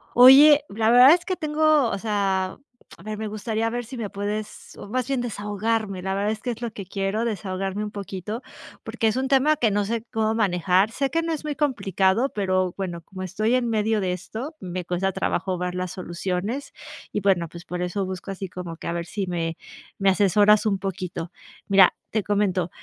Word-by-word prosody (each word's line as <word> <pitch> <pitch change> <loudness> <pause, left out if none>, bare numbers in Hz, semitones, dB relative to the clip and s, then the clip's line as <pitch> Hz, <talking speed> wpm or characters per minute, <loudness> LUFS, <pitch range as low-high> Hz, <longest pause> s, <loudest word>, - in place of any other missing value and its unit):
Oye, 280 +4 +9
la 220 +2 +1
verdad 250 +4 +9
es 345 0 0
que 370 - -1
tengo 310 -5 +2
o 200 - -2
sea, 195 -3 -1 0.4
a 170 - -16
ver, 215 +1 -5
me 220 0 -4
gustaría 215 +1 -2
ver 245 +1 -3
sí 240 +3 -9
me 215 -4 -4
puedes 210 +1 -5
o, - - -9
más 250 +3 -2
bien, 270 -2 0
desahogarme. 210 -3 -2
La 190 0 -1
verdad 200 +2 0
es 220 - -4
que 245 - -2
es 235 - -8
lo 235 -1 -3
que 200 -2 -8
quiero 195 +4 -2
desahogarme 195 -1 -3
un 210 - -4
poquito 200 +3 -6 0.4
porque 225 - -1
es 215 - +1
un 260 +1 0
tema 275 +3 +4
que 225 -5 +2
no 205 0 +1
sé 225 +1 -2
cómo 220 -1 0
manejar, 190 -1 +2
sé 275 +3 -1
que 330 +3 0
no 330 0 -1
es 310 - -5
muy 300 -1 -3
complicado, 230 - +1
pero 185 -4 0
bueno, 175 -3 -4
como 185 +3 -9
estoy 215 +6 0
en 245 -2 0
medio 220 -1 +1
de 185 -1 0
esto, 225 - -6
me 180 -1 -5
cuesta 180 +2 -1
trabajo 190 0 -1
ver 180 0 -3
las 180 -1 -3
soluciones. 185 +9 -4 0.4
Y 205 - -2
bueno, 185 -4 +2
pues, 170 +1 -11
por 180 0 -4
eso 180 +2 -2
busco 185 +1 -6
así 195 -1 -5
como 180 -2 -7
que - - -11
a - - -1
ver 170 0 -3
sí 195 +3 -3
me 165 -2 -2 0.4
me 195 -1 +3
asesoras 205 +2 +4
un 200 -2 +1
poquito. 185 -2 -5 0.4
Mira, 195 -2 +6 0.2
te 215 - +1
comento, 195 -4 0
205 Hz, 210 wpm, -24 LUFS, 185-230 Hz, 0.4 s, Oye